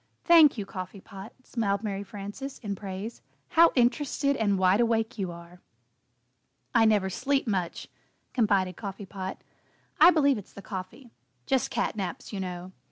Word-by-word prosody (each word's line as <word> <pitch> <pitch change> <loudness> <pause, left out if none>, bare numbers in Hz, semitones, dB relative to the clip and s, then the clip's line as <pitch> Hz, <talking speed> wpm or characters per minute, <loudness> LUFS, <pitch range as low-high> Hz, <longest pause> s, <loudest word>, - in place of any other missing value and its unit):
"Thank 325 -6 +7
you, 205 - -3
Coffee 185 +1 -7
Pot," 195 +3 -11
smiled 205 -5 -1
Mary 200 -2 -3
Frances, 205 +7 -7
in 205 -4 -4
praise, 195 +3 -7 0.3
"how 335 0 +6
interested 280 +3 +2
and 205 -5 +1
wide 190 +4 +4
awake 225 0 0
you 185 -3 -2
are!" 170 +1 -12 1.1
"I 230 -2 +5
never 210 -3 +3
sleep 270 +8 0
much," 185 -6 -2 0.5
confided 200 -6 +2
Coffee 200 +1 -7
Pot. 190 0 -7 0.6
"I 325 +3 +9
believe 285 -8 +3
it's 200 - -14
the 200 - -11
coffee 195 +6 -8 0.3
just 265 -3 +1
'cat - - -1
naps,' 190 0 -5
you 200 - -3
know. 180 -1 -5
205 Hz, 155 wpm, -27 LUFS, 190-245 Hz, 1.1 s, I